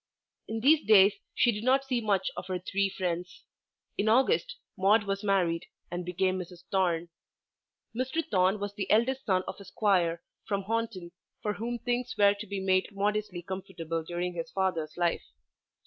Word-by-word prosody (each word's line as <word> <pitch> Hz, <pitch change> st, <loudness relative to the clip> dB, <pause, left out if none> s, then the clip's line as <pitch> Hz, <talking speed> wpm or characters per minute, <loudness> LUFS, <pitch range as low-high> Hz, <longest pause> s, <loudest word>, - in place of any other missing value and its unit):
In 225 Hz, 0 st, -3 dB
these 295 Hz, +5 st, +5 dB
days 205 Hz, -2 st, +7 dB, 0.2 s
she 240 Hz, -, +4 dB
did 210 Hz, 0 st, -5 dB
not 265 Hz, +2 st, +3 dB
see 255 Hz, -3 st, 0 dB
much 200 Hz, -4 st, +1 dB
of -, -, -6 dB
her 185 Hz, -1 st, -1 dB
three 195 Hz, +2 st, 0 dB
friends. 180 Hz, -2 st, -4 dB, 0.6 s
In 215 Hz, -, +2 dB
August 460 Hz, -, +3 dB, 0.2 s
Maude 205 Hz, +3 st, +4 dB
was 200 Hz, 0 st, -3 dB
married 180 Hz, -5 st, +1 dB, 0.2 s
and 175 Hz, 0 st, -3 dB
became 185 Hz, +1 st, 0 dB
Mrs. 180 Hz, -1 st, -9 dB
Thorne. 175 Hz, -3 st, +1 dB, 0.9 s
Mr. 260 Hz, +7 st, -1 dB
Thorne 190 Hz, +1 st, +2 dB
was 205 Hz, 0 st, -4 dB
the 200 Hz, -2 st, -4 dB
eldest 255 Hz, +5 st, +2 dB
son 185 Hz, -2 st, +2 dB
of -, -, -6 dB
a -, -, -9 dB
Squire 185 Hz, -4 st, +1 dB, 0.2 s
from 200 Hz, -1 st, -2 dB
Honiton 220 Hz, -5 st, -3 dB, 0.3 s
for 210 Hz, -, 0 dB
whom 235 Hz, +3 st, -3 dB
things 245 Hz, +1 st, -2 dB
were 200 Hz, -1 st, +6 dB
to 205 Hz, +1 st, -8 dB
be 200 Hz, 0 st, -3 dB
made 190 Hz, 0 st, +2 dB
modestly 205 Hz, -2 st, -1 dB
comfortable 170 Hz, -3 st, -4 dB
during 175 Hz, +2 st, -3 dB
his 165 Hz, -1 st, -5 dB
father's 170 Hz, -5 st, -1 dB
life. 175 Hz, -1 st, 0 dB
195 Hz, 170 wpm, -29 LUFS, 180-220 Hz, 0.9 s, days